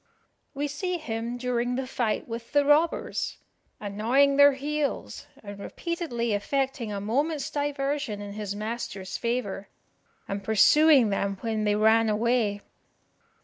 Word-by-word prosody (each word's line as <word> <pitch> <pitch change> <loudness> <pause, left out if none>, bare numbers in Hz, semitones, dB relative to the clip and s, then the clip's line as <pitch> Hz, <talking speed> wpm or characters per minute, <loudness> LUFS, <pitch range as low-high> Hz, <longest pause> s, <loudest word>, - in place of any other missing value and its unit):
We 290 +1 -1
see 360 +5 -3
him 235 -5 -4
during 245 0 -1
the 265 +1 -2
fight 240 -4 -2
with 230 +1 -7
the 290 -1 +4
robbers, 300 +3 +1 0.4
"annoying 235 +8 +2
their 285 0 +7
heels, 290 +1 -3 0.2
and 205 -1 -9
repeatedly 245 - -3
effecting 265 +2 -1
a 200 - -3
moment's 280 +8 -1
diversion 285 -5 -2
in 205 0 -7
his 205 -1 -4
master's 210 -3 -5
favour, 230 -5 -3 0.6
and 200 0 -4
pursuing 255 +4 +5
them 200 0 -1
when 220 -2 -1
they 205 0 +2
ran 220 +1 +4
away." 215 -1 +1
235 Hz, 130 wpm, -27 LUFS, 210-280 Hz, 0.6 s, their